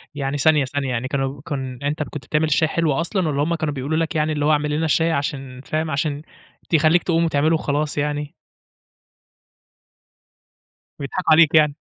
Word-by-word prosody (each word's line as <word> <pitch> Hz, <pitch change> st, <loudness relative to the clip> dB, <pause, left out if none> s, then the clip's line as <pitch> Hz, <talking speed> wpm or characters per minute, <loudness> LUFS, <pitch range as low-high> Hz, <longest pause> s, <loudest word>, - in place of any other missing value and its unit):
يعني 140 Hz, 0 st, -2 dB
ثانية، 150 Hz, -1 st, +3 dB
ثانية، 135 Hz, 0 st, -3 dB
يعني 125 Hz, +1 st, -2 dB
كانوا 135 Hz, 0 st, -3 dB
كن 130 Hz, -4 st, -5 dB
أنت 145 Hz, +2 st, -2 dB
اللي 155 Hz, -, -3 dB
كُنت 140 Hz, -5 st, -8 dB
بتعمل 155 Hz, +1 st, +1 dB
الشاي 155 Hz, +1 st, +2 dB
حلو 160 Hz, -2 st, 0 dB
أصلًا، 170 Hz, +3 st, -1 dB
والّا 145 Hz, -1 st, 0 dB
همّ 170 Hz, +2 st, 0 dB
كانوا 155 Hz, -3 st, -2 dB
بيقولوا 140 Hz, +4 st, -2 dB
لك 165 Hz, 0 st, -1 dB
يعني 155 Hz, 0 st, +1 dB
اللي 145 Hz, 0 st, -1 dB
هو 155 Hz, -, +3 dB
اعمل 150 Hz, 0 st, +1 dB
لنا 155 Hz, +2 st, 0 dB
الشاي 165 Hz, +1 st, +2 dB
عشان 135 Hz, -3 st, -3 dB
فاهم، 155 Hz, +2 st, -2 dB
عشان 145 Hz, +1 st, -1 dB, 0.5 s
تخليك 160 Hz, +1 st, +3 dB
تقوم 170 Hz, -1 st, +1 dB
وتعمله 155 Hz, 0 st, +2 dB
وخلاص 150 Hz, 0 st, -2 dB
يعني؟ 150 Hz, 0 st, -2 dB, 2.7 s
بيضحكوا 160 Hz, +4 st, -2 dB
عليك 160 Hz, 0 st, +6 dB
يعني. 150 Hz, -2 st, +4 dB
150 Hz, 175 wpm, -21 LUFS, 140-160 Hz, 2.7 s, عليك